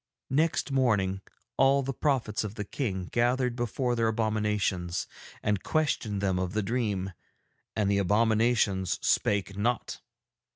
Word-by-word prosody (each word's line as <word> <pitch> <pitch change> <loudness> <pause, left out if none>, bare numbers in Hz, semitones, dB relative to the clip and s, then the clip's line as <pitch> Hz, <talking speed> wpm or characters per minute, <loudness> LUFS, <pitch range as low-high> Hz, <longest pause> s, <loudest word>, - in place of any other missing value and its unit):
Next 150 +1 +1
morning 105 -8 +1 0.4
all 135 +1 +4
the 135 +1 -3
prophets 125 -7 0
of 105 0 -5
the 105 - -3
King 100 -4 -3
gathered 125 +1 +1
before 120 +1 -1
their 115 -1 +2
abominations 105 -5 0 0.4
and 105 -2 +1
questioned 120 -10 0
them 95 -2 +1
of 90 0 -2
the 110 -1 0
dream, 100 -4 -1 0.6
and 105 -2 +1
the 100 0 +2
abominations 105 -1 +2
spake 100 -1 +1
not. 115 +4 -1
110 Hz, 130 wpm, -28 LUFS, 100-125 Hz, 0.6 s, all